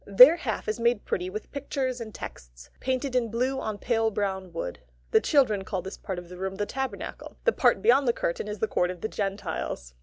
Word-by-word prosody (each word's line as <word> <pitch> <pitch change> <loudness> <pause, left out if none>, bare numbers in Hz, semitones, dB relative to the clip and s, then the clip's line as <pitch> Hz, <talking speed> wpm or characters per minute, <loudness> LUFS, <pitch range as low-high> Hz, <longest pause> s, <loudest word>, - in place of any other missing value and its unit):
Their 250 - +9
half 225 -10 -3
is 215 +3 -1
made 235 -2 +2
pretty 180 0 -1
with 215 +3 -7
pictures 265 -3 -2
and 220 -1 -6
texts, - - -10
painted 260 0 -1
in 240 -2 +2
blue 255 +4 0
on 215 -1 -3
pale 225 0 +1
brown 190 -3 -2
wood. 125 - -4 0.3
The - - +5
children 230 -9 +3
call 190 -2 -3
this 190 - -6
part 190 -3 -4
of 175 0 -7
the 180 +1 -10
room 190 0 -3
the 205 +1 -1
Tabernacle. 265 +4 -5
The 485 - +5
part - - +3
beyond 285 - +5
the - - +6
curtain 170 +1 -2
is 210 0 -4
the 220 - 0
court 180 - +1
of 180 -2 -6
the - - -1
Gentiles. 195 - -3
215 Hz, 220 wpm, -27 LUFS, 190-255 Hz, 0.3 s, Their